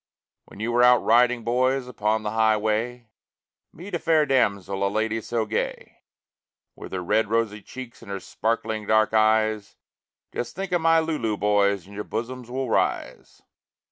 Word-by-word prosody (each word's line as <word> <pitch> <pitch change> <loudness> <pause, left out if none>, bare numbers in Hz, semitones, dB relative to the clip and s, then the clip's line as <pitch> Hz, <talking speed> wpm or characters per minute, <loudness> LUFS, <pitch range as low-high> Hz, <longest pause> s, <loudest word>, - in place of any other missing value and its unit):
When - - -15
you 115 +2 -2
are - - +5
out 125 0 +6
riding, 120 +1 +3
boys, 130 +2 +1
upon 110 -2 -1
the 105 - -2
highway, 110 +2 0 0.6
Meet 185 +4 -11
a 175 - 0
fair 160 -2 +3
damsel, 100 -7 0
a 100 - +2
lady 110 +2 -1
so 115 +1 -2
gay, 110 +1 -4 0.8
With - - -10
her 90 -1 -3
red, 110 +4 +1
rosy 110 -2 0
cheeks 125 +3 -10
and - - -13
her 100 0 -4
sparkling 110 +2 -3
dark 110 0 +3
eyes, 110 -1 +2 0.6
Just 120 0 -4
think 195 0 -5
of 175 -2 +1
my 165 0 +4
Lulu, 135 -10 -2
boys, 100 -2 +2
and 100 - -14
your 105 +1 -5
bosoms 120 +3 -5
will 130 +1 -3
rise. - - -2
110 Hz, 165 wpm, -24 LUFS, 105-125 Hz, 0.8 s, out